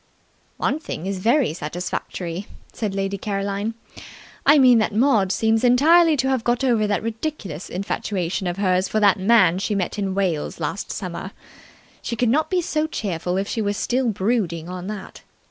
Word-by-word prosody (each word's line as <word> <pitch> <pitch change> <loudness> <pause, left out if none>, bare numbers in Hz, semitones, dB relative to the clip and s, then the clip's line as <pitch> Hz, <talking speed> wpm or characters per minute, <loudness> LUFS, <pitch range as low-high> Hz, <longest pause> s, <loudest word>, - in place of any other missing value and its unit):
"One 290 - 0
thing 185 - -6
is 195 -1 -3
very 235 - +2
satisfactory," 175 +3 -5 0.3
said 210 -4 -3
Lady 195 0 -2
Caroline. 200 +2 -2 0.7
"I 290 +2 +8
mean 250 -4 +6
that 215 -1 0
Maud 220 -6 +3
seems 225 +2 +1
entirely 310 +6 +5
to 265 0 +1
have 260 -3 0
got 240 +3 0
over 230 -5 +2
that 205 0 -1
ridiculous 225 - -5
infatuation 190 -1 -2
of 175 +1 -3
hers 185 -1 +1
for 215 - 0
that 200 -2 +4
man 190 -4 +4
she 205 +2 -1
met 195 +2 -2
in 195 -2 -2
Wales 180 -7 -1
last 165 +5 -3
summer. 185 +1 -5 0.7
She 235 - -3
could 235 +1 +1
not 310 +6 +2
be 365 -2 +1
so 310 -1 0
cheerful 180 - -3
if 195 +1 -1
she 225 - -2
were 205 -1 0
still 245 +4 0
brooding 190 -6 -1
on 180 0 -6
that. 205 -2 -7
205 Hz, 175 wpm, -22 LUFS, 185-240 Hz, 0.7 s, I